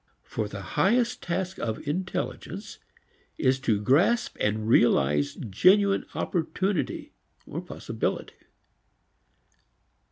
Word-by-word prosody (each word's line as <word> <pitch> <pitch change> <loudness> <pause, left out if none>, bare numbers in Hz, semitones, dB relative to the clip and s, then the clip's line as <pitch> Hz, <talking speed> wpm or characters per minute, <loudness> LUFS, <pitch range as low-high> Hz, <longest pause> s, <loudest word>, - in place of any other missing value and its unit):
For 110 -2 -3
the 100 -1 -7 0.2
highest 235 +4 +2
task 185 +2 -3
of 115 +6 -4
intelligence 180 +6 -4 0.6
is 130 0 +2
to 115 -6 +1
grasp 155 - +3
and 110 +1 0
realize 70 - +3
genuine 195 - +3
opportunity, 185 +2 -1 0.5
possibility. - - -4
150 Hz, 85 wpm, -27 LUFS, -, 0.6 s, grasp